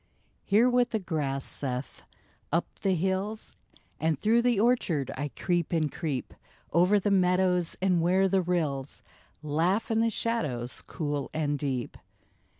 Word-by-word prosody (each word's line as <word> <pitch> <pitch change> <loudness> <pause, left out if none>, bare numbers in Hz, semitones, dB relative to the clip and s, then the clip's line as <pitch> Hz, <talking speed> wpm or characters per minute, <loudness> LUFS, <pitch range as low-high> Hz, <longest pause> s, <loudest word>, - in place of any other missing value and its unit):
Hear 215 +5 +4
what 245 -1 +3
the 220 - 0
grass 150 -8 -2
saith: 130 -1 -3 0.3
'* - - -37
Up 170 +3 +2
the 195 -2 +1
hills 190 +5 -2 0.4
And 160 -2 +1
through 225 - +3
the 240 -3 +2
orchard 195 - +1
I 145 +2 -3
creep 175 -3 -1
and 155 -4 +1
creep, 150 -6 -4 0.4
Over 180 +5 +4
the 205 +1 0
meadows, 180 -2 +2
and 180 -3 +3
where 185 +3 +3
the 190 0 +2
rills 155 -6 -2 0.4
Laugh 170 +10 0
in 225 - +2
the 230 0 +3
shadows 150 - -1
cool 145 -3 -3
and 145 -2 0
deep. 130 -4 -3
175 Hz, 150 wpm, -28 LUFS, 145-200 Hz, 0.4 s, Hear